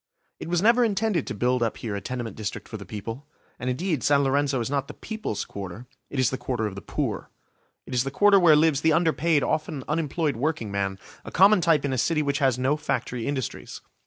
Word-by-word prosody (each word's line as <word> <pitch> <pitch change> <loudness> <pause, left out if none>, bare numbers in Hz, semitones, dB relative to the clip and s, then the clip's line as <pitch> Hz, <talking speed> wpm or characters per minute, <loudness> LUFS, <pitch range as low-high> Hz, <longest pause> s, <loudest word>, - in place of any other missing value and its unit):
It - - -6
was 175 +1 +1
never 235 +3 +5
intended 210 - 0
to - - -4
build 125 +3 +1
up 115 -2 0
here 110 -3 -4
a 100 - -4
tenement 120 -3 -5
district 110 0 -5
for 110 - -6
the 100 -3 -11
people. 115 +7 -7 0.3
And 125 - -2
indeed 155 +2 -1
San 140 -1 +3
Lorenzo 140 0 +1
is 115 - -2
not 140 -1 -1
the - - -9
People's 220 - -4
Quarter, 100 +4 -8 0.2
it - - -6
is 130 - +3
the 130 - -3
Quarter 120 -2 -2
of 105 - -3
the 100 - -8
poor. - - -3 0.6
It - - -8
is 125 0 +2
the 135 - -3
Quarter 200 +7 +5
where 170 -4 +6
lives 150 -2 +3
the 160 0 +3
underpaid, 160 -2 +2
often 155 -3 -2
unemployed 150 -2 -1
workingman, 105 -9 -2 0.3
a - - -8
common 195 +1 +5
type 160 -4 +3
in 135 - -1
a 130 - 0
city 155 +5 +1
which 140 0 0
has 135 -4 +2
no 130 +4 +1
factory 125 -5 -3
industries. 135 -4 -4
140 Hz, 220 wpm, -25 LUFS, 120-160 Hz, 0.6 s, where